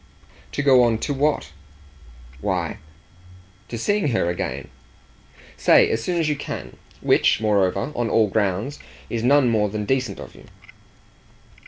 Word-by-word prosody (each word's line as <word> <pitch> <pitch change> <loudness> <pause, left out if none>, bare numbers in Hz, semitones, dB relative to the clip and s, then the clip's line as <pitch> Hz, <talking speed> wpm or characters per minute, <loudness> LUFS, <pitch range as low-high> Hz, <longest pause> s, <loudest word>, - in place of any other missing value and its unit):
"To 145 - -1
go 130 -3 +6
on 115 -2 +3
to 145 - -1
what?" 140 - 0 0.9
"Why, - - -2 0.9
to 120 - -6
seeing 205 - 0
her 115 -9 +1
again 85 - -5 0.9
say - - +5
as 115 0 -1
soon 175 +4 -1
as 160 - +1
you 150 - +1
can: - - -7 0.2
which, - - +3
moreover, 105 +4 +1
on 120 -1 -1
all 110 -2 +3
grounds, 105 +7 -1 0.3
is 115 - -1
no 140 +5 +5
more 110 -5 +2
than 105 +1 -4
decent 125 -4 -1
of - - -10
you." - - -16
115 Hz, 145 wpm, -22 LUFS, 105-140 Hz, 0.9 s, go